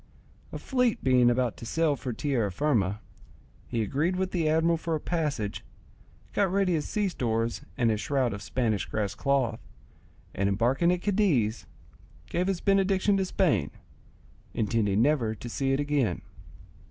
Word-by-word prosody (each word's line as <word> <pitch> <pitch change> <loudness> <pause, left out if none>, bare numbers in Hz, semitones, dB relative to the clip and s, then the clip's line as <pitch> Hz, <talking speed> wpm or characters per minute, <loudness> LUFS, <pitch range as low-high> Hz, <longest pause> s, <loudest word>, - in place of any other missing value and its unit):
A - - -5
fleet 250 -4 0
being 125 -2 +5
about 120 -1 0
to - - -9
sail 160 0 +1
for 130 -2 -5
Tierrafirma, 110 -4 0 0.7
he 115 -2 -1
agreed 150 - 0
with 185 0 -1
the 165 -4 +1
admiral 165 +2 +3
for 165 0 -2
a - - -2
passage, 150 -12 -2 0.7
got 195 -3 +1
ready 195 -2 +2
his 155 -3 -2
sea 210 -1 0
stores 115 -8 -1 0.2
and 115 -2 +2
his 105 -1 -1
shroud 130 -5 0
of 100 - -6
Spanish 110 -3 -1
grass 105 -2 -2
cloth, 130 -5 0 0.7
and 100 0 0
embarking 125 - +2
at 180 0 -1
Cadiz, 165 - +1 0.6
gave 180 +2 0
his 190 -3 -1
benediction 195 0 +2
to 190 - +1
Spain, 175 - +1 0.9
intending 105 -1 +1
never 125 -6 +1
to 120 - -9
see 135 +3 -1
it 135 - +1
again. 145 -10 0
135 Hz, 155 wpm, -28 LUFS, 115-175 Hz, 0.9 s, being